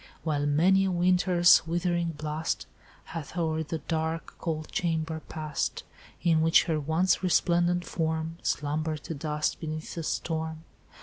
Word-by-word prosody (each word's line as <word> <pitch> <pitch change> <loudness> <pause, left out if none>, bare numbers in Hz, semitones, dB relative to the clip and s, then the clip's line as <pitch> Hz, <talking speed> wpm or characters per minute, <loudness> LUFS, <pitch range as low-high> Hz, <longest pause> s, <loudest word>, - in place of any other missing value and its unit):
While 145 -3 0
many 180 +7 +4
a - - +1
winter's 180 -1 +4
withering 170 0 0
blast 155 +1 -3 0.4
Hath 165 +1 -7
o'er 160 -2 0
the 160 +1 -3
dark 160 +2 -3
cold 155 -3 -3
chamber 160 -2 -1
passed, 155 -2 -3 0.4
In 165 -2 +4
which 165 +1 +5
her 160 -3 0
once 160 +5 +2
resplendent 175 -1 +2
form 160 0 -2
Slumbered 155 +1 -1
to - - -5
dust 150 0 -2
beneath 155 0 -5
the 170 - -4
storm. 160 0 -3
160 Hz, 135 wpm, -28 LUFS, 155-175 Hz, 0.4 s, which